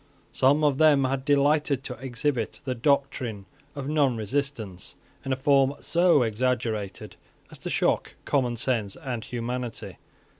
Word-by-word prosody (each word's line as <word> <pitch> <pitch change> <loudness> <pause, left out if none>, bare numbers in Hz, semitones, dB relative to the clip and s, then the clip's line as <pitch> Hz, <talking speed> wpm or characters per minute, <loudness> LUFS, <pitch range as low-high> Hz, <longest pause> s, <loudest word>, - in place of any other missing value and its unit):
Some 145 +4 +3
of 145 -2 +2
them 150 -3 +5
had 130 0 -1
delighted 145 -1 +2
to 125 - -5
exhibit 130 -2 -2
the 130 - -1
doctrine 125 -5 0 0.3
of 140 -1 -5
nonresistance 130 -7 -1 0.3
in 135 - -4
a - - +2
form 135 0 +3
so 170 -5 +3
exaggerated 110 -3 -2 0.3
as - - -11
to - - -5
shock - - 0
common 125 -4 +1
sense 115 -5 -1
and 120 -4 -5
humanity. 120 0 -5
130 Hz, 135 wpm, -26 LUFS, 120-140 Hz, 0.3 s, them